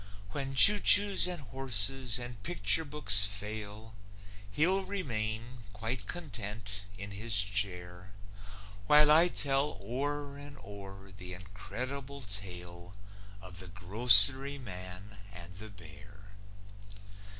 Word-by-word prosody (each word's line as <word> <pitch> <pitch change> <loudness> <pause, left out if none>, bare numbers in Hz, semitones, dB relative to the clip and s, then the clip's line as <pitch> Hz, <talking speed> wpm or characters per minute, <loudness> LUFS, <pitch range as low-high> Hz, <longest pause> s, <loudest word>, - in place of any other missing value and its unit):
When 135 -1 -6
choo 205 +9 +8
choos 200 -3 +6
and 175 - -8
horses 130 -1 0
and 120 -3 -10
picture 165 +3 +1
books 140 -9 0
fail, 105 +1 -7 0.6
He'll 180 - +2
remain, 120 - -6
quite 110 0 -6
content, 105 - -8
in 100 +1 -9
his 105 +2 -2
chair, 95 -3 -4 0.8
While 150 0 +4
I 165 +3 +4
tell 140 - -2
o'er 140 +6 -6
and 145 0 -13
o'er 100 -1 -13
the 90 -1 -10
incredible 130 +9 -9
tale 90 -3 -11 0.5
Of 90 -1 -10
The 95 - -8
Grocery 110 +8 +5
Man 95 -3 -12
and 90 -1 -13
the 110 +2 -11
Bear. 100 +1 -17
110 Hz, 110 wpm, -29 LUFS, 100-135 Hz, 0.8 s, choo